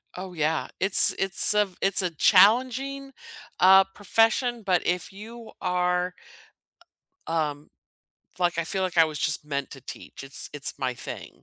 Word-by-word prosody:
Oh 185 0 -7
yeah. 155 -1 -1
It's 190 +1 +3
it's 195 +2 +2
a 210 - +4
v 190 -2 -18
it's 195 0 +1
a 180 - 0
challenging, 255 - +3 0.5
uh, 190 +1 +7
profession, 225 +3 +1
but 185 -3 +1
if 180 +2 -2
you 225 +3 -11
are, 180 0 0 1.1
um, 150 -3 -2 0.7
like, 175 -1 0
I 170 - 0
feel 190 +3 -3
like 185 -2 -3
I 165 - +7
was 155 -1 -5
just 150 -1 -2
meant 140 -2 -4
to 135 - -11
teach - - -10
it's 135 0 -8
it's 145 -1 -4
my 130 -2 -2
thing. - - -9
180 Hz, 160 wpm, -25 LUFS, 160-205 Hz, 1.1 s, uh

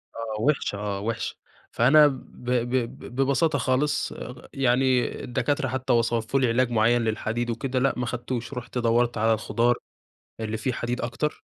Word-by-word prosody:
آه 110 -2 -4
وِحشة 140 -5 +1
آه 100 -1 -3
وِحشة. 115 +2 -3 0.4
فأنا 145 +6 +6
ب 135 -3 -2 0.3
ب 120 -1 +1 0.3
ب 120 - -10
ببساطة 140 +3 +2
خالص 140 +3 +1
اغ 125 0 -9
يعني 130 -1 +2
الدكاترة 135 +2 -1
حتّى 130 0 -1
وصفوا 115 +2 +1
لي 130 - +3
علاج 120 +1 +2
معيّن 120 +1 +3
للحديد 115 +1 -1
وكده 130 +3 -1
لأ 135 +2 +2
ما 125 - -1
أخدتوش. 120 +1 -4
رُحت 125 0 -6
دوّرت 120 0 +2
على 110 +1 +3
الخضار 120 +2 +1 0.6
اللي 110 0 -3
فيه 120 +4 -1
حديد 120 +1 -3
أكتر 125 +6 -3
120 Hz, 160 wpm, -25 LUFS, 115-130 Hz, 0.6 s, فأنا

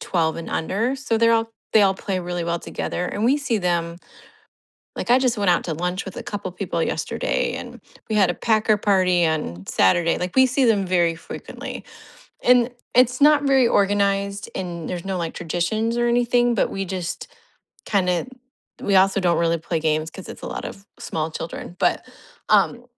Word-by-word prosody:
12 160 -3 0
and 165 - -7
under, 225 +11 -1
so 245 -4 -1
they're 230 0 +4
all 225 0 +1 0.2
they 215 - +7
all 195 -1 +4
play 190 -1 -3
really 175 -1 -3
well 170 0 -1
together 180 - -4
and 205 +4 -3
we 275 +4 +4
see 275 -6 -1
them 170 -2 -1 1.0
like, - - -4
I 250 - +7
just 250 -3 +1
went 200 -3 +2
out 175 - +2
to 160 - -3
lunch 180 +3 -3
with 190 - -9
a - - -5
couple 205 -3 -5
people 180 -3 -3
yesterday - - -1
and - - -8 0.3
we 215 - -1
had 190 -4 +4
a - - -2
packer 215 -1 +2
party 185 -4 +3
on 95 - -3
Saturday, 165 - +2
like 180 0 -4
we 260 - +7
see 255 +1 +1
them 205 -5 +2
very 175 -2 +2
frequently, - - -8 0.6
and 250 0 +4 0.2
it's 250 0 +4
not 295 0 +6
very 265 -3 +4
organized 200 0 +1
and 170 -3 -5
there's 180 -2 -4
no 190 -1 -2
like 165 -2 -3
traditions 215 +8 -1
or 240 - +2
anything, 240 0 +2
but - - +1
we 195 0 -3
just 180 -2 -5 0.6
kinda 180 -3 +1 0.6
we 200 -1 +2
also 195 +1 +4
don't 175 -2 +2
really 170 0 +1
play 165 +1 -2
games 155 0 0
'cause 190 - -11
it's - - -10
a - - -5
lot - - -5
of 195 - -8 0.2
small 160 0 -3
children, 165 +2 -7
but, - - +1 0.5
um, 245 0 +3
195 Hz, 190 wpm, -22 LUFS, 170-230 Hz, 1.0 s, they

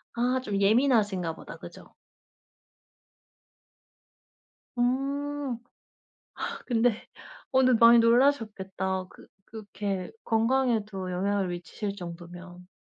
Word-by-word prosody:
아 250 +2 +1
좀 205 -5 -2
예민하신가보다 205 - +1
그죠? - - -13 2.8
음. 275 +1 -1 1.1
근데 235 -2 +1 0.5
어 260 - +4
네 255 0 +5
많이 235 0 +7
놀라셨겠다. 215 -7 +1
그 - - -17 0.2
그렇게 205 -3 -5
건강에도 225 -5 0
영향을 195 +2 0
미시칠 180 +4 -5
정도면. 175 0 -10
215 Hz, 185 characters per minute, -27 LUFS, 190-245 Hz, 2.8 s, 많이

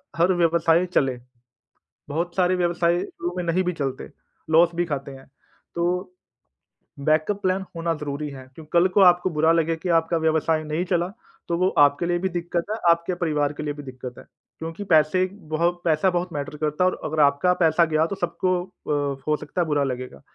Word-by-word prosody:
हर 175 +3 +3
व्यवसाय 170 0 +3
चले। 130 -3 +2 0.9
बहुत 170 +4 -2
सारे 185 0 +3
व्यवसाय 175 0 +1
शुरू 175 +1 -5
में 180 - -1
नहीं 175 +2 +1
भी 180 - 0
चलते 135 -5 -4 0.4
लॉस 165 +2 +5
भी 175 +1 0
खाते 140 -3 -4
हैं। 135 0 -13 0.5
तो 170 0 -1 1.2
बैकअप 155 +7 +1
प्लान 190 +1 0
होना 165 0 -1
ज़रूरी 150 -1 -4
है, 135 -2 -9
क्योंकि 155 -1 -12
कल 175 +2 +5
को 190 +2 +2
आपको 180 0 +5
बुरा 160 0 +2
लगे 165 0 +2
कि 165 +3 -5
आपका 165 0 +2
व्यवसाय 160 0 +1
नहीं 155 +3 -2
चला 175 -1 0 0.4
तो 170 - 0
वो 185 +1 +2
आपके 145 +3 +4
लिए 175 0 0
भी 190 +1 -1
दिक्कत 175 -1 -2
है, - - 0
आपके 170 +2 +2
परिवार 150 -4 0
के 150 - -6
लिए 145 -1 -2
भी 145 0 -9
दिक्कत 130 -1 -8
है - - -14 0.3
क्योंकि 165 +5 -6
पैसे 155 +4 +4
बहुत 170 -1 -2
पैसा 160 +3 +3
बहुत 180 0 -1
मैटर 145 +1 -4
करता 150 +3 -1
है 185 - +5
और - - -8
अगर 155 0 -2
आपका 140 +6 +3
पैसा 165 +1 +4
गया 155 0 +1
तो 200 - -4
सबको 185 +1 -1
अ, 145 -6 -3
हो 155 - +3
सकता 150 +4 -4
है 165 - 0
बुरा 145 -2 +1
लगेगा। 130 -1 -5
165 Hz, 200 wpm, -24 LUFS, 150-175 Hz, 1.2 s, लॉस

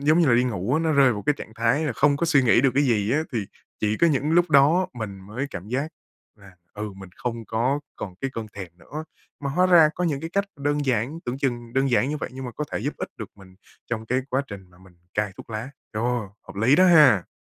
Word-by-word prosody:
giống 155 +4 +3
như 170 - +4
là 120 - +5
đi 125 - +3
ngủ 115 +1 -1
á, 160 - +2
nó 160 -1 +1
rơi 135 -4 +5
vào 105 - -5
cái 150 -1 +2
trạng 110 - -9
thái 115 +7 +1
là 150 - -1
không 145 +4 +3
có 170 - 0
suy 150 -5 +4
nghĩ 120 -1 +5
được 135 - +3
cái 140 - +4
gì 110 -4 +1
á, 155 +2 +2
thì 110 -5 -2 0.3
chỉ 105 0 +1
có 170 - +4
những 145 -1 +1
lúc 175 0 +3
đó 155 +6 +5
mình 110 -6 -6
mới 110 +8 -5
cảm 90 +4 -8
giác 135 +6 -1 0.5
là, 100 -3 -17 0.2
ừ, 105 0 -5
mình 95 -2 -11
không 115 -2 -4
có 125 +7 0 0.2
còn 95 - -6
cái 135 - -2
cơn 115 -1 -4
thèm 95 -3 -7
nữa. 155 - -7 0.4
Mà 140 -1 -3
hóa 180 +6 +3
ra 170 -4 +7
có 180 - -2
những 150 -5 -1
cái 165 - -6
cách 200 +2 +1
đơn 145 +1 -1
giản, 125 +5 0
tưởng 125 +2 -3
chừng 120 -4 -2
đơn 135 0 +1
giản 125 +2 +2
như 150 - -2
vậy - - -5
nhưng 130 +1 -7
mà 125 - -5
có 150 - -4
thể - - -1
giúp - - -3
ích - - -5
được - - -7
mình 95 -2 -16 0.4
trong 110 -1 -3
cái 125 +3 +1
quá 130 +2 +1
trình 95 -3 -10
mà 90 - -21
mình 95 -1 -18 0.2
cai 105 -2 -1
thuốc - - -12
lá. 110 +4 -5 0.2
Ồ, 120 +3 0 0.2
hợp - - -12
lý 120 +8 +4
đó 185 +2 +6
ha! 150 - +6
125 Hz, 270 wpm, -24 LUFS, 110-145 Hz, 0.5 s, ra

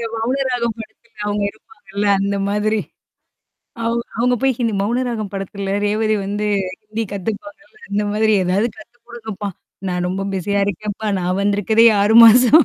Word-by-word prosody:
மௌன 225 +4 -1
ராகம் 235 -3 -1
படத்துல. 230 +1 -12
அவங்க 205 0 -1
இருப்பாங்கல்ல 210 - -7
அந்த 200 +1 0
மாதிரி. 210 +1 +1 1.1
அவு 230 0 +1 0.2
அவுங்க 245 +2 +2
போய் 270 0 +3
இது 230 -2 +1
மௌனராகம் 230 -1 -2
படத்துல 195 0 -4
ரேவதி 215 +1 +1
வந்து 205 +2 -2 0.4
ஹிந்தி 215 +2 -4
கத்துப்பாங்க. 220 +10 -5 0.3
அந்த 205 +1 0
மாதிரி 215 +1 +2
ஏதாவது 185 +5 +1
கத்து 220 +2 -15
குடுங்கப்பா. 220 -4 -6 0.4
நான் 180 0 -1
ரொம்ப 190 +2 -2
பிஸியா 200 +2 0
இருக்கேன்ப்பா. 210 +2 -4
நான் 180 +1 -1
வந்திருக்கதே 205 +3 +3
6 205 +2 +3
மாசம். 250 +7 +7
215 Hz, 140 wpm, -19 LUFS, 200-230 Hz, 1.1 s, மாசம்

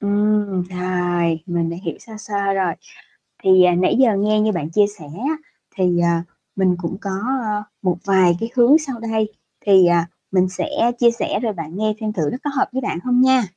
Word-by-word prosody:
Ừm, 205 -2 +1
rồi, 175 -2 -1
mình 170 -2 -1
đã 170 - -5
hiểu - - -4
sơ 225 - -15
sơ 200 -2 -2
rồi. 185 -3 0 0.7
Thì, 185 -1 +6
à, 180 -1 +4
nãy 180 +1 +2
giờ 240 -6 +4
nghe 215 +1 +2
như 215 0 +2
bạn 160 -4 -3
chia 205 +3 +4
sẻ 155 - -10
á 240 - -3 0.4
thì, 180 -2 +1
à, 170 -1 +1 0.3
mình 185 -2 +2
cũng 175 0 -5
có, 200 - -4 0.3
ơ, 210 -1 -2 0.2
một 180 -3 0
vài 185 -3 +4
cái 225 - -3
hướng 255 +5 +6
sau 270 -7 -6
đây 220 -1 -1 0.4
thì, 190 -3 +6
à, 170 -1 +3 0.3
mình 185 -1 +2
sẽ 185 - -4 0.3
chia 235 -1 +5
sẻ 235 - -2
rồi 225 -4 -2
bạn 165 -1 -7
nghe 215 0 0
xem 215 -1 -3
thử 155 -6 -1
nó - - -4
có 290 - -1
hợp 265 - +1
với 265 +1 -3
bạn 170 - -3
không 250 0 +2
nha! 260 -1 +4
195 Hz, 210 wpm, -20 LUFS, 175-220 Hz, 0.7 s, Thì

